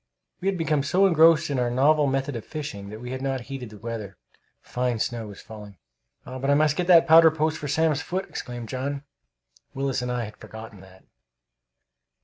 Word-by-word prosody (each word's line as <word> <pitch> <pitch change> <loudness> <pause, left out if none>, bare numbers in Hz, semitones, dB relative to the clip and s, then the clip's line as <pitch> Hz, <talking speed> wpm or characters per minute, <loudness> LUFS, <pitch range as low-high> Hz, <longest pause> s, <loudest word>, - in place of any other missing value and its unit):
We 190 - -3
had 195 -1 +1
become 155 -3 +1
so 185 +8 +2
engrossed 165 -4 +5
in 135 - 0
our 120 -1 +1
novel 145 +4 +3
method 135 0 -1
of 115 - -5
fishing 100 -10 -7
that 110 +2 -9
we 125 0 -6
had 130 0 -5
not 135 -1 -2
heeded 130 -2 -7
the 105 - -12
weather. 105 -3 -6 0.4
Fine 125 -1 -2
snow 115 0 -3
was 100 -2 -11
falling. 105 -3 -11 0.5
"But 130 +2 -4
I 145 - +5
must 150 0 +3
get 175 +1 -1
the 170 -3 +7
powder 165 0 +7
post 155 0 -1
for 145 - -5
Sam's 150 0 +1
foot!" 190 +5 -3
exclaimed 120 -2 -7
John. 135 +3 -4 0.7
Willis 135 -2 -1
and 125 0 -3
I 125 -1 -1
had 105 - -11
forgotten 110 -3 -11
that. 95 0 -17
135 Hz, 195 wpm, -25 LUFS, 115-155 Hz, 0.7 s, the